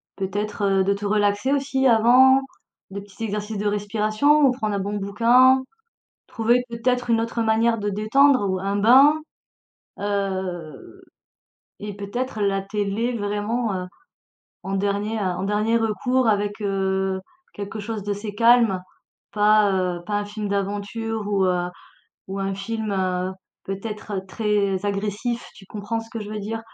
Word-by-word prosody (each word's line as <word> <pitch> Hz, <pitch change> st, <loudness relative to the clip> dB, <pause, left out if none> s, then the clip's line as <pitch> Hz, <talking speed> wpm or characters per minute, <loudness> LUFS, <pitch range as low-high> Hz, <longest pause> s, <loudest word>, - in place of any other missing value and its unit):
Peut-être 195 Hz, 0 st, -1 dB
de 200 Hz, +1 st, +2 dB
te 205 Hz, +1 st, -6 dB
relaxer 205 Hz, +4 st, +1 dB
aussi 270 Hz, -1 st, 0 dB
avant, 250 Hz, +4 st, +6 dB, 0.5 s
des 200 Hz, +1 st, -5 dB
petits 205 Hz, +3 st, -7 dB
exercices 210 Hz, 0 st, -4 dB
de 205 Hz, +1 st, -1 dB
respiration 215 Hz, +8 st, +2 dB
ou 265 Hz, -, +6 dB
prendre 215 Hz, -5 st, -2 dB
un 200 Hz, -, -1 dB
bon 200 Hz, +2 st, -3 dB
bouquin, 240 Hz, +6 st, +4 dB, 0.7 s
trouver 240 Hz, +2 st, +1 dB
peut-être 245 Hz, +1 st, -1 dB
une 230 Hz, -, +3 dB
autre 230 Hz, 0 st, -2 dB
manière 225 Hz, +1 st, +2 dB
de 205 Hz, 0 st, -1 dB
détendre 215 Hz, +2 st, +3 dB
ou 185 Hz, 0 st, -1 dB
un 200 Hz, +1 st, -2 dB
bain. 260 Hz, +8 st, +7 dB, 0.9 s
Heu 190 Hz, -6 st, -4 dB, 0.8 s
et 205 Hz, -1 st, -6 dB
peut-être 215 Hz, +4 st, -4 dB
la 195 Hz, -1 st, +1 dB
télé 210 Hz, +4 st, -2 dB
vraiment, 210 Hz, +2 st, -1 dB
heu, 180 Hz, 0 st, -4 dB, 0.8 s
en 195 Hz, -, -4 dB
dernier 205 Hz, +3 st, -1 dB
heu, 205 Hz, -, -1 dB
en 180 Hz, 0 st, -2 dB
dernier 210 Hz, +3 st, +1 dB
recours 240 Hz, +3 st, 0 dB
avec, 205 Hz, 0 st, 0 dB
heu, 190 Hz, -1 st, -1 dB, 0.3 s
quelque 205 Hz, +1 st, -6 dB
chose 210 Hz, 0 st, -5 dB
d'assez 205 Hz, +1 st, -4 dB
calme, 230 Hz, -5 st, +4 dB, 0.5 s
pas, 210 Hz, -1 st, +4 dB
heu, 180 Hz, -2 st, -1 dB
pas 210 Hz, -, -2 dB
un 205 Hz, -, -1 dB
film 210 Hz, 0 st, -5 dB
d'aventure 205 Hz, +2 st, -3 dB
ou, 195 Hz, -2 st, +1 dB
heu, 180 Hz, -1 st, 0 dB, 0.6 s
ou 195 Hz, +1 st, -4 dB
un 195 Hz, 0 st, -2 dB
film, 215 Hz, +1 st, -4 dB
heu, 185 Hz, -1 st, -1 dB, 0.3 s
peut-être 205 Hz, 0 st, -5 dB
très 205 Hz, -2 st, 0 dB
agressif. 205 Hz, +4 st, -2 dB
Tu 195 Hz, -, -15 dB
comprends 215 Hz, +3 st, -4 dB
ce 225 Hz, -, -13 dB
que 225 Hz, -, -5 dB
je 210 Hz, -, -7 dB
veux 215 Hz, -, -4 dB
dire? 225 Hz, +2 st, -4 dB
205 Hz, 150 wpm, -23 LUFS, 195-225 Hz, 0.9 s, bain